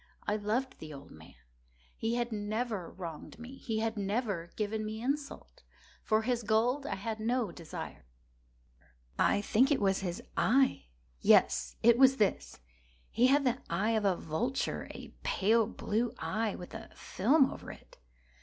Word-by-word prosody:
I 210 - +1
loved 225 +5 -2
the 155 - -8
old 140 -1 -11
man. 80 0 -14 0.6
He 225 +1 -1
had 240 0 -1
never 215 -2 -2
wronged 170 -2 -8
me. 245 +3 -10
He 220 -1 -2
had 225 0 -1
never 200 -4 -2
given 215 0 -2
me 215 +1 -4
insult. 275 +4 -4 0.4
For 220 0 +1
his 245 0 0
gold 235 +6 +1
I - - -2
had 220 +3 -4
no 230 -2 0
desire. 165 - -8 1.1
I 205 - +3
think 240 +6 +3
it 290 - +3
was 195 -1 +2
his 175 -3 -4
eye! 260 - +3 0.3
yes, - - +4
it 235 +1 +6
was 270 0 +6
this! 210 -3 0 0.5
He 245 - +4
had 280 +2 +4
the 250 +1 +1
eye 195 +7 +1
of 220 -2 +1
a 190 -2 +3
vulture—a 235 - -3
pale 220 +2 +2
blue 230 +2 -2
eye, 220 -1 -1
with 180 - -9
a - - -8
film 265 +8 +3
over - - -8
it. - - -16
220 Hz, 155 wpm, -31 LUFS, 200-245 Hz, 1.1 s, it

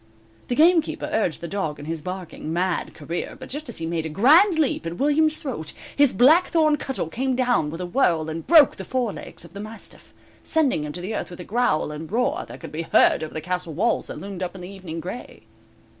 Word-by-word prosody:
The 245 - -1
gamekeeper 330 +2 +3
urged 210 -7 0
the 170 - -4
dog 160 -6 -3
in 145 - -9
his 160 0 -4
barking, 180 -2 -6
mad 180 +1 -1
career, 165 +3 -5
but 260 - -9
just 295 0 -6
as 235 - -5
he 165 - -4
made 165 -1 -2
a - - -6
grand 315 - +5
leap 285 - 0
at 170 +1 -5
William's 310 +2 +2
throat, 230 - -4 0.2
his 285 -3 +5
blackthorn 310 - +4
cudgel 270 - -3
came 255 +9 -1
down 245 -11 +1
with 165 +3 -6
a - - -2
whirl 175 - +1
and 160 +1 -5
broke 315 -5 +7
the 190 - -6
forelegs 235 -5 -4
of 170 - -15
the 200 - -8
mastiff, 215 +2 -10 0.3
sending 280 - +1
him 150 - -5
to 180 +6 -5
earth 210 - -3
with 175 - -10
a - - -6
growl 210 -8 0
and 155 +3 -7
roar 265 - 0
that - - -10
could - - -9
be 155 - -3
heard 165 - +4
over 155 - -7
the 155 - -3
castle 180 -1 -3
walls 235 - +1
that - - -7
loomed 195 -2 -7
up 180 +1 -3
in 185 - -9
the 180 - -7
evening 185 -4 -7
gray. 185 +9 -8
195 Hz, 225 wpm, -24 LUFS, 165-265 Hz, 0.3 s, broke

